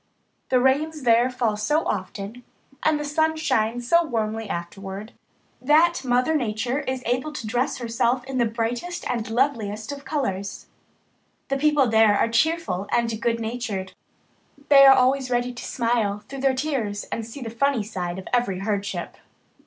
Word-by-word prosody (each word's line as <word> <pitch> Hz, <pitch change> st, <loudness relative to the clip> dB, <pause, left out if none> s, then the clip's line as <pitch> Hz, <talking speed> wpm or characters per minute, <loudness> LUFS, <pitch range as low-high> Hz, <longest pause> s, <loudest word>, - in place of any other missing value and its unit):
The 255 Hz, -, +4 dB
rains 290 Hz, +4 st, +1 dB
there 240 Hz, +1 st, +4 dB
fall 240 Hz, -4 st, 0 dB
so 295 Hz, +10 st, 0 dB
often, 200 Hz, +5 st, -4 dB, 0.4 s
and 310 Hz, -1 st, +2 dB
the 295 Hz, -, -3 dB
sun 315 Hz, +2 st, +1 dB
shines 240 Hz, -5 st, 0 dB
so 340 Hz, +5 st, +5 dB
warmly 225 Hz, -6 st, -2 dB
afterward, 195 Hz, +5 st, -6 dB, 0.5 s
that 305 Hz, +3 st, +4 dB
Mother 250 Hz, +4 st, +2 dB
Nature 245 Hz, -1 st, -1 dB
is 260 Hz, -3 st, -4 dB
able 255 Hz, +5 st, -1 dB
to 265 Hz, -6 st, -6 dB
dress 240 Hz, +4 st, -1 dB
herself 240 Hz, +1 st, 0 dB
in 265 Hz, 0 st, -4 dB
the 235 Hz, -, +3 dB
brightest 235 Hz, +10 st, -3 dB
and 230 Hz, -3 st, -2 dB
loveliest 225 Hz, -3 st, -1 dB
of 285 Hz, 0 st, -7 dB
colours. 200 Hz, -10 st, -3 dB, 0.8 s
The 275 Hz, -, +1 dB
people 295 Hz, -1 st, +3 dB
there 220 Hz, -2 st, +4 dB
are -, -, +2 dB
cheerful 230 Hz, -, 0 dB
and 230 Hz, -2 st, 0 dB
good 230 Hz, -1 st, 0 dB
natured. 220 Hz, -5 st, -4 dB, 0.8 s
They 275 Hz, -1 st, +9 dB
are 270 Hz, -, +9 dB
always 260 Hz, 0 st, +2 dB
ready 245 Hz, 0 st, 0 dB
to 245 Hz, -, -8 dB
smile 225 Hz, -4 st, -1 dB
through 275 Hz, -, -7 dB
their 270 Hz, -1 st, +2 dB
tears 255 Hz, -8 st, -2 dB
and 230 Hz, -, -2 dB
see 230 Hz, +5 st, -9 dB
the 230 Hz, -3 st, -5 dB
funny 260 Hz, 0 st, +1 dB
side 180 Hz, -4 st, -4 dB
of 190 Hz, -, -8 dB
every 240 Hz, -7 st, +1 dB
hardship. 200 Hz, +1 st, -3 dB
240 Hz, 160 wpm, -24 LUFS, 215-275 Hz, 0.8 s, They